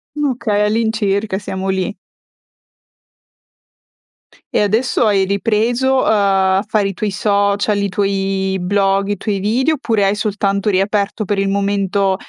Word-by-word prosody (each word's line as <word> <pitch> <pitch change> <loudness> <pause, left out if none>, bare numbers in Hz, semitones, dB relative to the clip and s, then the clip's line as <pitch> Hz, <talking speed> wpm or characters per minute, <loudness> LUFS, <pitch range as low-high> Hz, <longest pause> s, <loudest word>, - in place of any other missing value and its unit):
Okay, 250 -8 -1
all'incirca, 210 -2 0
siamo 190 -1 -4
lì. 190 +1 -2 2.6
E - - +2
adesso 225 +4 +1
hai 200 -2 +3
ripreso 230 +6 +1
a 200 -2 +2 0.2
a - - -3
fare 210 -2 +1
i 195 - -4
tuoi 205 +2 -3
social, 200 +1 +1
i 200 0 -1
tuoi 195 0 -1
blog, 195 +1 +1
i 205 - -1
tuoi 200 0 -2
video, 250 +10 +1
oppure 225 -7 0
hai 195 - +1
soltanto 200 -1 -1
riaperto 200 +2 0
per 200 +1 -1
il 195 0 0
momento 200 -1 0
200 Hz, 130 wpm, -17 LUFS, 195-215 Hz, 2.6 s, hai